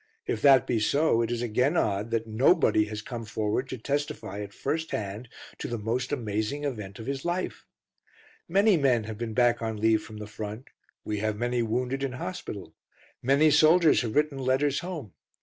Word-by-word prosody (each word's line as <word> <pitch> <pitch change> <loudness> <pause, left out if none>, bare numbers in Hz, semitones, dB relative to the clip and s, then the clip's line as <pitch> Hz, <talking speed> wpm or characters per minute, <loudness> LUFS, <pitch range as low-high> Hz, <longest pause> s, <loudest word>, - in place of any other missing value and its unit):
If - - -2
that 135 -3 +6
be 120 - 0
so, 130 +2 +2
it 115 - -1
is 120 0 -2
again 125 +8 +1
odd 105 -2 0
that 115 -1 -1
Nobody 115 - +3
has 105 0 -6
come 120 -1 -6
forward 110 +4 -2
to 130 - -4
testify 140 -6 -3
at 100 -1 -7
first 160 +8 -3
hand 105 +3 -4 0.3
to - - -4
the 120 - -3
most 120 +4 -2
amazing 110 +2 -2
event 105 -9 -4
of 110 - -8
his 135 0 -3
life. 175 +2 -3 0.8
Many 195 +2 +4
men 130 -6 +2
have 110 0 -7
been 115 -2 -4
back 120 -1 +3
on 110 -1 -2
leave 110 0 +3
from 110 0 -10
the 105 - -6
front, 105 +3 -7 0.4
we 105 -1 -2
have 110 0 -1
many 120 +1 0
wounded 125 +4 -1
in 135 -2 -2
hospital, 95 -7 -6 0.5
many 140 +4 +4
soldiers 155 +2 +5
have 115 -3 -4
written 150 -2 +1
letters 135 +2 +1
home. 160 - -6
120 Hz, 185 wpm, -27 LUFS, 110-140 Hz, 0.8 s, that